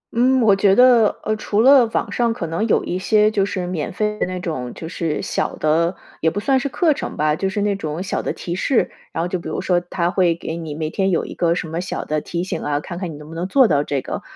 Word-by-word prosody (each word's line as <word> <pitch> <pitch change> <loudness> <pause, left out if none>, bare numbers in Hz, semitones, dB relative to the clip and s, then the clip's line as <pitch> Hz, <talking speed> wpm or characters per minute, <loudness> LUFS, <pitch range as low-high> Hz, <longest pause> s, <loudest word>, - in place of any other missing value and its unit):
嗯， 255 +2 +3
我 210 -4 +5
觉 195 0 +4
得， 245 -3 +5
呃， 215 - 0
除 210 0 -1
了 260 -2 +7
网 - - -2
上 235 -1 +1
可 175 - -4
能 165 +7 -1
有 - - +2
一 180 - -2
些 210 +2 +3
就 200 -2 +1
是 185 -3 -3
免 175 -4 -3
费 210 +2 -2
的 - - 0
那 185 0 -4
种， 130 -9 -4
就 160 - -7
是 165 -3 -3
小 - - -2
的， 165 +3 +1 0.3
也 160 - +3
不 195 - -3
算 265 +5 +2
是 280 - -2
课 320 +3 +2
程 - - -6
吧， 150 0 +2
就 190 +3 -1
是 205 +1 -2
那 205 -1 +1
种 160 -2 -4
小 195 - -2
的 - - -2
提 170 - -5
示， 230 +7 +1 0.2
然 165 - -2
后 - - -1
就 180 0 -2
比 - - -7
如 - - -3
说 180 -2 +1
它 175 0 -2
会 175 -4 +2
给 165 -1 -5
你 160 -3 -6
每 155 0 -3
天 195 +2 0
有 170 - 0
一 - - -7
个 170 -1 +1
什 175 - -3
么 165 +2 -3
小 180 - -4
的 155 0 -1
提 175 0 -3
醒 185 - -4
啊， 145 -1 -1
看 170 +3 -7
看 180 -4 -4
你 - - -8
能 150 +1 -11
不 160 - -10
能 170 +3 -3
做 260 +4 +5
到 145 -5 +2
这 140 -2 -2
个。 - - -5
180 Hz, 300 characters per minute, -20 LUFS, 165-210 Hz, 0.3 s, 了